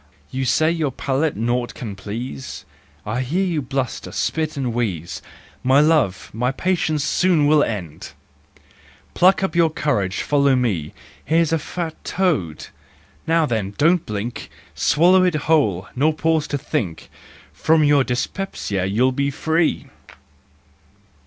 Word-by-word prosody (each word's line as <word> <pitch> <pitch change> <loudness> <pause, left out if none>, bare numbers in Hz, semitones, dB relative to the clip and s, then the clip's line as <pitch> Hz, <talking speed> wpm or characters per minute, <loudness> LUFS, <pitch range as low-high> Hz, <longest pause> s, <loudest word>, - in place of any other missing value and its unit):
You 130 0 -2
say 155 +6 +3
your 160 -4 0
palate 140 +3 -1
naught 120 +2 -1
can 105 -5 -6
please, 115 +6 -7 0.4
I 110 +4 -2
hear 170 +10 0
you 170 -5 -1
bluster, 130 -1 -3
spit 155 -2 -2
and 125 -4 -2
wheeze, 95 -9 -3 0.4
My 130 +2 +5
love, 150 - +2
my 125 +4 0
patience 155 -1 0
soon 170 -1 +2
will 150 0 +5
end! 85 -8 -5 1.0
Pluck 185 +2 +4
up 190 - -1
your 170 -1 +4
courage, 100 - -1
follow 140 -2 +3
me— 100 -12 -1 0.3
Here's 165 0 +2
a 165 - +2
fat 165 +2 -4
toad! 150 - -1 0.6
Now 165 0 +3
then, 105 -6 -2
don't 170 +3 +3
blink, 105 +3 -5 0.2
Swallow 180 +5 +4
it 180 -3 +2
whole, 140 - +1
nor 155 +4 +2
pause 160 -1 +1
to 145 - -2
think! 130 - -3 0.5
From 160 0 +3
your 145 -2 +4
dyspepsia 125 - -3
you'll 115 +7 +2
be 140 +2 0
free! 160 +4 0
140 Hz, 135 wpm, -21 LUFS, 115-160 Hz, 1.0 s, My